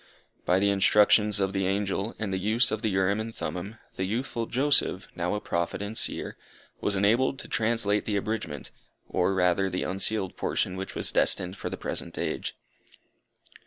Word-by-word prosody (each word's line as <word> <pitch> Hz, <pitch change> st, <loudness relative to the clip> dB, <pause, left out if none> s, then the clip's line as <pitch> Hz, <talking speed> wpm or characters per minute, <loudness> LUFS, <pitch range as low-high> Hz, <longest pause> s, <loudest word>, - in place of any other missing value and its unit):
By 90 Hz, -, +3 dB
the 100 Hz, +1 st, +3 dB
instructions 105 Hz, +1 st, +4 dB
of 95 Hz, -1 st, 0 dB
the 95 Hz, -1 st, 0 dB
angel, 100 Hz, +2 st, -1 dB
and 105 Hz, -3 st, -3 dB
the 95 Hz, -, 0 dB
use 110 Hz, +5 st, +2 dB
of 110 Hz, -, -2 dB
the 110 Hz, -, 0 dB
Urim 95 Hz, +1 st, +1 dB
and 110 Hz, +1 st, -5 dB
Thummim, 95 Hz, +5 st, -5 dB, 0.2 s
the -, -, -1 dB
youthful 115 Hz, +3 st, -2 dB
Joseph, 135 Hz, -8 st, +2 dB
now 90 Hz, +3 st, -1 dB
a -, -, -1 dB
Prophet 85 Hz, -3 st, -2 dB
and 105 Hz, +2 st, -5 dB
Seer, -, -, -1 dB, 0.4 s
was 100 Hz, -, 0 dB
enabled 115 Hz, +8 st, +2 dB
to 140 Hz, -, -9 dB
translate 110 Hz, -2 st, +1 dB
the 105 Hz, -2 st, 0 dB
abridgment, 110 Hz, +3 st, -4 dB, 0.4 s
or 95 Hz, +1 st, +1 dB
rather 95 Hz, +1 st, +2 dB
the 90 Hz, 0 st, -2 dB
unsealed 95 Hz, +1 st, -1 dB
portion 90 Hz, -, -1 dB
which 95 Hz, +1 st, -6 dB
was -, -, +1 dB
destined 90 Hz, +1 st, +2 dB
for -, -, -5 dB
the -, -, -5 dB
present -, -, -2 dB
age. -, -, -3 dB
100 Hz, 175 wpm, -27 LUFS, 95-110 Hz, 0.4 s, instructions